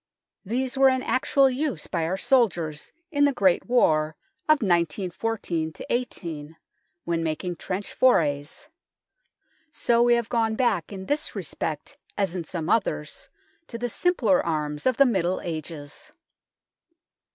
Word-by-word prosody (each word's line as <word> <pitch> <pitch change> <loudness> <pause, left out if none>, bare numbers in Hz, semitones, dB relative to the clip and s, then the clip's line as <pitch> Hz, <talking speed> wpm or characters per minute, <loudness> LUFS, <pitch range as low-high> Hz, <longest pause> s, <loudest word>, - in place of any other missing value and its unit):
These 250 +5 -2
THE - - -4
NORMAN 260 -1 +5
KEEP - - -8
39 - - -6
were - - +2
in - - +4
actual 270 +1 +3
use 265 - -2
by 160 - -2
our 180 +4 -1
soldiers 175 - +1 0.2
in 285 -2 +2
the 285 - +3
Great 190 -8 +2
War 155 -11 +3 0.3
of 310 -5 +4
1914 175 -1 -1 0.2
18, 165 -10 -4 0.5
when 170 -1 0
making 165 +3 -2
trench 190 +4 -4
forays. 150 - +1 1.0
So 235 -4 +2
we 240 0 +5
have 235 -2 -1
gone 225 -2 +1
back, 220 -9 0
in 190 -1 -7
this 290 +6 -2
respect - - -4 0.2
as 195 -4 0
in 175 -3 -4
some 160 -1 -4
others, 170 -8 -1 0.4
to 230 - -6
the 245 +1 -3
simpler 235 - +2
arms 150 -1 -2
of 255 - +2
the 275 - +7
Middle 185 -6 +1
Ages. 155 -3 -7
190 Hz, 150 wpm, -25 LUFS, 160-245 Hz, 1.0 s, the